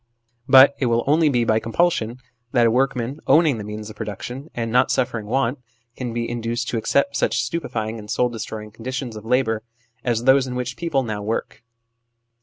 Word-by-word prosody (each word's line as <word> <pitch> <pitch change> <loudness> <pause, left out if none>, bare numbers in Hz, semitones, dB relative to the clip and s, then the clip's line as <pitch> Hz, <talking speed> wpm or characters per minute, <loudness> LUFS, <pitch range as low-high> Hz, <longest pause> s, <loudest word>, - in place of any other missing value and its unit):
But 135 +1 +8
it 130 - +1
will 115 0 +2
only 155 +2 +4
be 120 -4 +2
by 110 -1 +3
compulsion 115 -2 0 0.4
that 120 -2 +4
a 115 - +4
workman, 130 +2 0
owning 155 -7 +4
the - - -5
means 105 0 -6
of - - -13
production 120 - -6
and 115 -1 -2
not 125 +2 +4
suffering 120 -4 -1
want, 130 +2 0 0.4
can 125 -2 -4
be 115 0 -2
induced 120 +1 -3
to 120 - -1
accept 140 +5 +1
such - - +1
stupefying 115 -6 -3
and 105 -1 -11
soul 125 +2 +2
destroying 110 -2 -6
conditions 125 +2 -5
of 110 0 -9
labour 115 -2 +1 0.4
as 120 -2 0
those 130 +1 +5
in 125 - -5
which 125 0 -3
people 165 -6 0
now 110 -3 -4
work. 110 +3 -3
120 Hz, 190 wpm, -22 LUFS, 110-130 Hz, 0.4 s, But